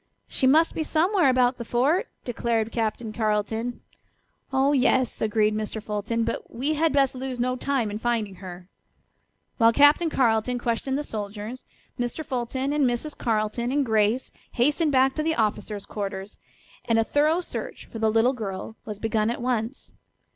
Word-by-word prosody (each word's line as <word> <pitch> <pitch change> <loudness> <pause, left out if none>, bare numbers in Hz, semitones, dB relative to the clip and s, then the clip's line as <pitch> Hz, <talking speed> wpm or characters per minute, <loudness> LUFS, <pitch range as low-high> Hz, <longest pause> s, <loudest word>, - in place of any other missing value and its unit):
"She 260 - +1
must 315 +5 +4
be - - -2
somewhere 335 +1 +3
about 250 0 +3
the - - -3
fort," 285 - +1 0.2
declared 230 -2 -1
Captain 220 -1 -2
Carleton. 220 +2 -1 0.7
"Oh, 270 +1 +3
yes," 260 -2 +2
agreed 215 0 +2
Mr. 215 +1 -3
Fulton, 215 +2 -2
"but - - -3
we 275 +6 -1
had 315 +1 +2
best 275 -2 +3
lose 260 -1 -5
no 255 +1 +1
time 255 -5 -1
in 210 - -4
finding 220 -5 -1
her." 180 -1 -9 0.9
While 230 0 +6
Captain 290 +6 +5
Carleton 245 -3 +1
questioned 240 +3 -1
the 295 - -2
soldiers, 215 +1 -6 0.3
Mr. 245 +6 -3
Fulton 260 +1 -2
and 295 -3 +3
Mrs. 245 +5 -3
Carleton 225 +1 -1
and 285 0 +1
Grace 220 +2 +1 0.2
hastened 295 +5 +2
back 265 0 +4
to 310 - -2
the 320 +1 0
officers' 210 -1 -1
quarters, 200 -1 -5 0.5
and 230 - +2
a 225 - +4
thorough 300 +8 +2
search 360 - -6
for 225 - -9
the 220 0 +2
little 225 +4 +3
girl 210 -2 -5
was 210 -2 -5
begun 220 0 0
at 235 - -2
once. 240 0 -3
240 Hz, 165 wpm, -25 LUFS, 220-270 Hz, 0.9 s, While